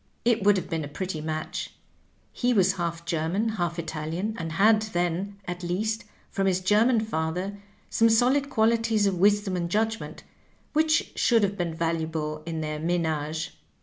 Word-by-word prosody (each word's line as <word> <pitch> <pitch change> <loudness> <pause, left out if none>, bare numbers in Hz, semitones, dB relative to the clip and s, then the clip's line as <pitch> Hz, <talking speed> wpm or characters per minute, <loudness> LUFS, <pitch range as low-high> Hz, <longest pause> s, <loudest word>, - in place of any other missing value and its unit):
It 235 -2 +3
would 205 0 +5
have 185 - -3
been 160 -2 -2
a - - -5
pretty 160 +2 -4
match; 160 +4 -4 0.6
he 245 0 +1
was 190 -1 +4
half 170 -2 -3
German, 170 +8 0
half 175 -6 -2
Italian, 165 +5 -3
and 165 -1 -4
had 215 +4 +5
then, 185 -1 -2
at 180 0 -5
least, 215 +6 -2 0.3
from 195 -1 0
his 185 -1 +2
German 215 +5 +3
father, 185 0 -2 0.3
some 230 0 +4
solid 255 +5 +3
qualities 225 -3 +2
of 190 -3 0
wisdom 205 0 +3
and 170 -1 -2
judgment, 220 +3 -2 0.5
which 310 +1 +2
should 230 -3 +3
have 200 0 +1
been 175 -4 -2
valuable 160 -2 -2
in 160 -1 -3
their 155 -1 -3
menage. 160 -2 -1
185 Hz, 160 wpm, -26 LUFS, 165-215 Hz, 0.6 s, would